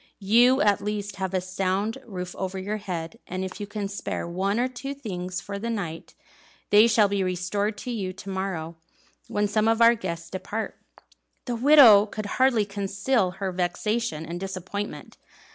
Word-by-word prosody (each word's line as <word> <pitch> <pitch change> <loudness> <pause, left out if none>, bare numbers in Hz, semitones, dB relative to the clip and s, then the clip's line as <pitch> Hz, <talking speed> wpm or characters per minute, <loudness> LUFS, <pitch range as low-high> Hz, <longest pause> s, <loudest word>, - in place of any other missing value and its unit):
You 240 +6 +4
at 205 -2 +3
least 205 -1 -4
have 190 -1 -2
a - - +3
sound 190 +5 -1
roof 180 -4 -6
over 190 0 -4
your 205 +3 -3
head, 170 -5 -5
and 185 +1 -3
if 190 - -7
you 205 - -5
can 205 -1 -4
spare 200 -3 -4
one 195 +5 -1
or 250 - +2
two 270 +2 -6
things 185 -8 -5
for 200 0 -6
the 230 +3 -3
night, 175 -8 -5 0.6
they 210 +2 +7
shall 215 -2 +4
be 200 0 -1
restored 185 +4 -1
to 250 - -5
you 200 -6 -3
to 190 +1 -10
morrow, 175 -4 -4 0.5
when 205 0 0
some 215 +1 +1
of 225 0 +3
our 235 0 +7
guests 170 -6 -5
depart." 205 +4 -4 0.7
The 245 - -2
widow 235 -5 +8
could 215 0 -5 0.2
hardly 245 -5 +4
conceal 200 +2 0
her 195 -1 -2
vexation 180 0 -1
and 170 +1 -5
disappointment. 195 +2 -6
200 Hz, 175 wpm, -26 LUFS, 185-220 Hz, 0.7 s, widow